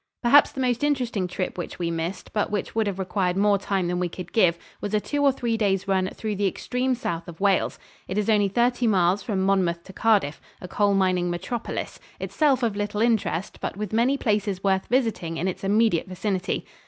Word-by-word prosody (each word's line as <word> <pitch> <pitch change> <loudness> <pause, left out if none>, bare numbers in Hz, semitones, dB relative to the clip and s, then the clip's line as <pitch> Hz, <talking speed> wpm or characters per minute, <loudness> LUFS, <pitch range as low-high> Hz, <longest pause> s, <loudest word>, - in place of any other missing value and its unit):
Perhaps 280 +4 +6
the 265 - -3
most 250 0 0
interesting 250 -10 0
trip 180 0 -4
which 175 - -5
we 170 -1 -2
missed, 165 +3 -4
but 210 - 0
which 205 -2 -3
would 220 -1 +1
have 195 -2 -2
required 185 -1 -1
more 200 0 +3
time 195 -2 -1
than 180 0 -1
we 180 -1 -1
could 180 0 -9
give, 175 -6 +4 0.2
was 205 +1 -2
a - - +3
two 290 +7 -2
or 280 -1 +5
three 240 -3 -1
days' 195 -3 0
run 190 -1 +1
through 215 -2 -3
the 200 0 +1
extreme 250 +7 -1
south 170 -8 -4
of 170 -2 -10
Wales. 195 -1 +2 0.3
It 185 - -3
is 210 - 0
only 210 -2 +4
thirty 240 +4 +1
miles 190 -1 +3
from 190 -2 -1
Monmouth 180 -3 +1
to 190 - -12
Cardiff, 200 -9 +2 0.2
a 180 - -8
coal 200 +2 +2
mining 185 -2 +2
metropolis, 220 +7 -4 0.2
itself 275 -5 +1
of 225 -4 +1
little 205 0 -2
interest, 215 -7 0
but - - -4
with 210 -1 -4
many 245 +5 +3
places 205 -5 -1
worth 190 -1 +1
visiting 225 -10 0
in 180 - -1
its 185 - -4
immediate 205 -3 +2
vicinity. 185 0 -2
200 Hz, 210 wpm, -25 LUFS, 185-225 Hz, 0.3 s, Perhaps